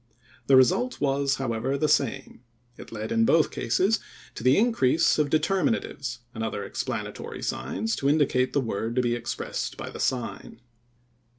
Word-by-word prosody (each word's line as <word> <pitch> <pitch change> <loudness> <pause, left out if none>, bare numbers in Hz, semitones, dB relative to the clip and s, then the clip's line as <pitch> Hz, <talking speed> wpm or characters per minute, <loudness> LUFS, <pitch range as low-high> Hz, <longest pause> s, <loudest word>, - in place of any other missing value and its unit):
The 135 - +6
result 185 - +3
was, 140 -1 +1
however, 130 +1 -2
the 155 - +1
same. 135 -3 0 0.3
It - - -12
led 110 -1 -5
in 115 0 +3
both 160 +6 +3
cases 205 +4 +1 0.3
to - - -8
the 130 +2 +5
increase 200 - +3
of 150 -1 +2
determinatives, 155 - 0
and 110 - -4
other 105 -2 -3
explanatory 100 - -5
signs 225 0 -2
to 140 - +1
indicate 140 -4 +2
the 140 - +2
word 115 0 -3
to 125 - +2
be 120 -1 +1
expressed 120 -1 -4
by - - -6
the - - -9
sign. 125 -2 -3
135 Hz, 160 wpm, -26 LUFS, 120-150 Hz, 0.3 s, The